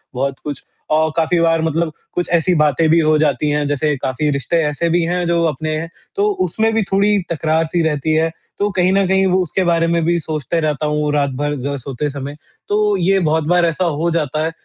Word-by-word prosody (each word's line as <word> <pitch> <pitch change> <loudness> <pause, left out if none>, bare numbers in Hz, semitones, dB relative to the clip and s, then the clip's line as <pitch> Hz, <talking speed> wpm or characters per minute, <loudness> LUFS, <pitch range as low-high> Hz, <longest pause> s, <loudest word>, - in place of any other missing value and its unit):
बहुत 135 +1 -2
कुछ 145 -2 -6 0.3
और 155 +1 +3
काफ़ी 165 +1 +2
बार 165 -1 +2
मतलब 160 0 0 0.2
कुछ 175 - -2
ऐसी 170 +2 +3
बातें 150 +2 +3
भी 165 +1 +5
हो 155 -1 +3
जाती 150 0 +1
हैं 145 0 0
जैसे 145 +1 0
काफ़ी 130 +3 -1
रिश्ते 140 +4 -1
ऐसे 165 +3 -1
भी 175 +1 +2
हैं 175 +1 -1
जो 170 0 +2
अपने 155 +1 -2
हैं। 165 +1 -6 0.3
तो 200 - +1 0.2
उसमें 220 +6 0
भी 225 - +2
थोड़ी 205 +2 +3
तकरार-सी 160 +1 0
रहती 150 +1 -1
है। 160 +1 +2 0.3
तो 205 - +1
कहीं 180 +1 +3
न 195 -1 +3
कहीं 190 +1 +3
वो 185 +1 +2
उसके 185 +3 -1
बारे 170 -1 +2
में 170 -1 +1
भी 170 0 +2
सोचता 155 +1 -2
रहता 150 0 -2
हूँ 150 0 0
रात 145 -1 +1
भर 145 0 -1
ज 140 0 -2
सोते 140 +3 -3
समय। 140 +1 -6 0.3
तो 210 0 +2
ये 190 +2 +2
बहुत 160 0 +1
बार 175 -1 +4
ऐसा 165 +2 0 0.2
हो 170 - +1
जाता 155 -1 -1
है 165 - -2
160 Hz, 220 wpm, -18 LUFS, 150-175 Hz, 0.3 s, भी